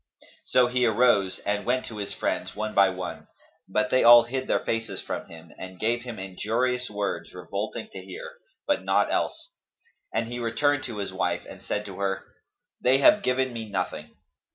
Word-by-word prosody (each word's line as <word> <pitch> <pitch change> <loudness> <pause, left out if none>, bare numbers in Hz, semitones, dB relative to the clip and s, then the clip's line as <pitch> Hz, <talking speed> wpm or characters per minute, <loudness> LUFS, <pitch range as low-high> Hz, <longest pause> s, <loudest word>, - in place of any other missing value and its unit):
So 125 - +4
he 125 +1 +1
arose 110 -4 +3
and 105 0 0
went 130 +1 0
to 110 - -7
his 100 -1 -4
friends - - -2
one 110 +1 -3
by 100 -1 +6
one; 90 -1 -6 0.4
but 105 +2 +1
they 130 - +4
all 120 0 +10
hid 130 +2 -4
their - - +2
faces 115 -4 -2
from - - -5
him 80 0 -13
and 95 -1 -8
gave 120 +2 +1
him 120 -2 -7
injurious 115 +7 -1
words 105 -1 -3
revolting - - -4
to - - -8
hear, - - -8 0.3
but - - +1
naught - - +2
else; - - -2 0.6
and 115 - -1
he 120 +1 -5
returned 140 +5 +1
to 115 -4 -6
his 100 -1 -4
wife - - -1
and - - -11
said 105 0 -3
to 100 -1 -8
her, 95 -1 -1 0.6
"They 130 +2 +5
have 200 +10 +6
given 130 -2 +1
me 110 -2 -6
nothing." 90 -5 -4
115 Hz, 185 wpm, -26 LUFS, 100-125 Hz, 0.6 s, all